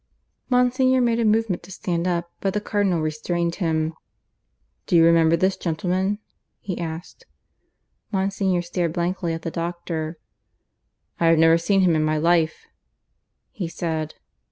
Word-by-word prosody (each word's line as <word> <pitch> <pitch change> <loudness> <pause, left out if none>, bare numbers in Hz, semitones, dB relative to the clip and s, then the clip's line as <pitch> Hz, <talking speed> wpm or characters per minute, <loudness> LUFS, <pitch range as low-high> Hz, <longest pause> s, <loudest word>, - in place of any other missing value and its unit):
Monsignor 255 +1 +3
made 235 -2 +2
a - - +2
movement 215 -3 +1
to 180 - -14
stand 175 -1 -2
up, 170 -1 -2
but 195 0 -1
the - - +2
Cardinal 205 -5 0
restrained 170 +2 -1
him. 160 -1 0 0.9
"Do 180 - +1
you 165 -1 +7
remember 165 -1 +5
this 185 +2 +1
gentleman?" 185 +4 -1 0.4
he 185 -3 -5
asked. 165 0 -7 0.8
Monsignor 190 -2 0
stared 175 -1 -2
blankly 175 0 -1
at 165 0 -5
the 165 - -3
doctor. 170 -1 -4 1.0
"I 170 - +3
have 165 0 +5
never 165 +1 +5
seen 195 +3 +2
him 175 -3 +3
in 155 - +2
my 155 0 +1
life," 165 0 +1 0.9
he 180 -5 -4
said. 160 -2 -3
175 Hz, 145 wpm, -23 LUFS, 165-190 Hz, 1.0 s, you